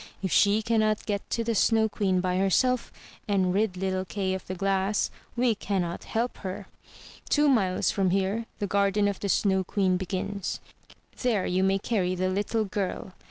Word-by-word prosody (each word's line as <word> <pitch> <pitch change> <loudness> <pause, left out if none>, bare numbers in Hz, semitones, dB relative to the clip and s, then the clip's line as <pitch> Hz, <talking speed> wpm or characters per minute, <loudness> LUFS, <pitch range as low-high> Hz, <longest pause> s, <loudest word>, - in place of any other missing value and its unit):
If 190 - -1
she 205 +2 +4
cannot 215 -2 +1
get 200 -2 -3
to 230 - -1
the 230 0 0
Snow 220 +1 +3
Queen 190 -3 0
by 180 0 0
herself, 235 +6 +2 0.4
and 190 -3 +2
rid 200 -2 0
little 185 0 -1
Kay 190 0 -2
of 190 - -5
the 185 - -4
glass, 195 +2 0 0.2
we 240 -1 +3
cannot 185 -5 -3
help 235 +2 -2
her. 185 -1 -6 0.6
Two 295 0 +4
miles 195 -9 +2
from 195 -2 +1
here 195 +5 0
the 205 - -2
garden 200 +1 +2
of 200 -1 -2
the 200 - -3
Snow 190 -1 +2
Queen 185 0 +1
begins; 190 +2 -3 0.6
there 230 -7 +1
you 185 +1 +1
may 195 0 +3
carry 190 -3 -1
the 185 +1 0
little 205 +3 0
girl. 195 -1 -4
195 Hz, 175 wpm, -27 LUFS, 185-215 Hz, 0.6 s, she